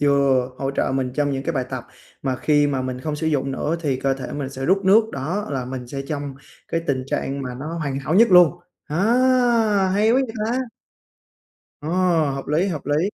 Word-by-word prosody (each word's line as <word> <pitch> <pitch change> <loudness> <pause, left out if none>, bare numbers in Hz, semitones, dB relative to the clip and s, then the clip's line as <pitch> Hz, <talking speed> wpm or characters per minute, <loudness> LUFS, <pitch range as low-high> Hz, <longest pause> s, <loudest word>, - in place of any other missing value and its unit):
vừa 140 -3 +3
hỗ 135 0 -1
trợ 140 - -1
mình 130 -2 -1
trong 145 0 +1
những 135 -1 -2
cái 165 - -2
bài 130 -4 -1
tập, 130 -2 -5 0.4
mà 130 -2 -1
khi 145 +3 +3
mà 135 -2 -1
mình 130 -1 -4
không 150 +2 -3
sử 160 - -3
dụng 140 -3 0
nữa 155 +5 -1
thì 145 -5 0
cơ 135 -1 +1
thể 135 -1 -7
mình 140 -2 -4
sẽ 135 -1 -6
rút 190 +6 +2
nước, 215 +4 +5
đó, 170 +10 -3
là 135 -3 -2
mình 125 -1 -6
sẽ 135 +3 -5
trong 145 -2 -4 0.3
cái 165 - -1
tình 130 -2 -1
trạng 135 0 -2
mà 125 -1 -5
nó 150 +6 -6
hoàn 140 -4 -2
hảo 140 +4 -2
nhất 230 +4 +6
luôn. 180 -3 +7 0.3
Ờ, 150 - -4 1.0
hay 210 +3 +3
quá - - +3
vậy 260 -3 +1
ta! 240 +3 0 1.2
Ờ, 150 - -5 0.4
hợp 135 0 -5
lý, 155 +6 +1
hợp 155 -8 -5
lý. 150 +5 +1
140 Hz, 220 wpm, -22 LUFS, 135-165 Hz, 1.2 s, luôn